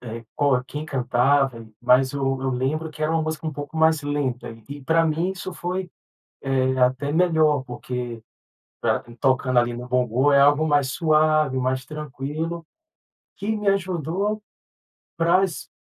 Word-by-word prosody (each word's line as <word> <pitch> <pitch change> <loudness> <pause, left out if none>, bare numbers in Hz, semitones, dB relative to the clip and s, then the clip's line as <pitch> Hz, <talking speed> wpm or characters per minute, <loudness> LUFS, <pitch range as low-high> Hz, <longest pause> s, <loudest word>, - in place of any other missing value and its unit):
eh, 115 -1 -7
qual 135 -3 +2
quem 150 +3 -6
cantava. 130 -2 +1
Mas 125 +2 +3
o 135 -1 -1
eu 135 - -1
lembro 135 +6 -1
que 155 - -8
era 155 +1 +1
uma 165 - +2
música 155 +1 -4
uma 155 - -2
pouco 145 +1 -7
mais 160 -1 +4
lenta. 145 -4 -2 0.2
E, 145 +1 -8
pra 165 +4 +3
mim, 165 +4 0
isso 185 0 -7
foi, 180 +1 -4 0.5
eh, 130 -1 0
até 130 +3 +2
melhor, 160 -4 +3
porque 120 -2 -6 0.6
pra - - +1 0.2
tocando 130 -1 +1
ali 120 0 +3
no 120 +1 -7
bongô, 125 +2 +2
é 140 - +5
algo 145 +3 +4
mais 145 -3 +2
suave, 155 -3 +2
mais 130 0 -1
tranquilo, 150 +3 -5 0.7
que 210 +2 -2
me 210 -1 -3
ajudou 195 +2 0 0.8
para 170 +3 +3
as 170 -8 -3
145 Hz, 155 wpm, -23 LUFS, 130-160 Hz, 0.8 s, é